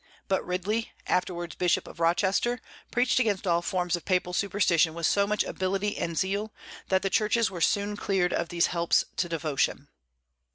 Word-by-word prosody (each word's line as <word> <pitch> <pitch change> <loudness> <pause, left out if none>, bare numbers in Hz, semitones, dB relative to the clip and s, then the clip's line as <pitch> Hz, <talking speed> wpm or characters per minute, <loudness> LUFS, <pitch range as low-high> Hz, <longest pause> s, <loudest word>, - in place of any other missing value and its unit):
But 190 -2 +1
Ridley, 200 +5 -2
afterwards 175 -2 -1
Bishop 180 -2 +1
of - - -12
Rochester, 190 +8 +2 0.3
preached 250 +1 +2
against 210 -6 0
all 170 -2 +2
forms 180 0 0
of 175 - -7
papal 180 -1 0
superstition 175 -4 +2
with 170 -1 -2
so 200 +4 +3
much 210 0 +1
ability 195 +2 -2
and 165 -1 -3
zeal 200 +4 -1 0.4
that 190 0 +2
the 195 - +1
churches 215 0 +2
were 175 -3 -6
soon 205 +4 +1
cleared 190 -3 0
of 170 0 -1
these 170 -1 +2
"helps 170 -1 +2
to 175 - 0
devotion." 155 -4 -1
185 Hz, 170 wpm, -27 LUFS, 170-205 Hz, 0.4 s, so